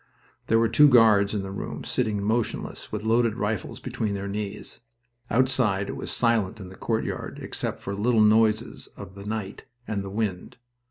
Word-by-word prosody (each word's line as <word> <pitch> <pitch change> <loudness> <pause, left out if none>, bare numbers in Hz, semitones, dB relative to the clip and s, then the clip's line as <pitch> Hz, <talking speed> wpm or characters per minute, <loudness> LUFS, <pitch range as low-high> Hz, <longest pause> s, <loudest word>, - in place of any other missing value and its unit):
There 115 - +4
were 115 0 +4
two 145 +6 +6
guards 110 -5 +5
in 100 - -1
the 95 - -6
room, 100 - -5
sitting 105 -4 -1
motionless, 110 +2 -2
with 105 -1 -4
loaded 115 0 +2
rifles 105 -3 -3
between 105 -2 -3
their 100 0 -4
knees. 100 0 -5 0.5
Outside 120 -6 +2
it - - -4
was - - -5
silent 110 -4 +1
in 95 -2 -8
the 95 - -12
courtyard, 110 +2 -3
except - - -4
for 100 - -4
little 110 +3 +2
noises 110 +1 +3
of 95 - -9
the 100 +1 -10
night 105 -2 -4 0.2
and 100 -2 -2
the 100 - -6
wind. 100 -3 -3
105 Hz, 175 wpm, -26 LUFS, 100-115 Hz, 0.5 s, two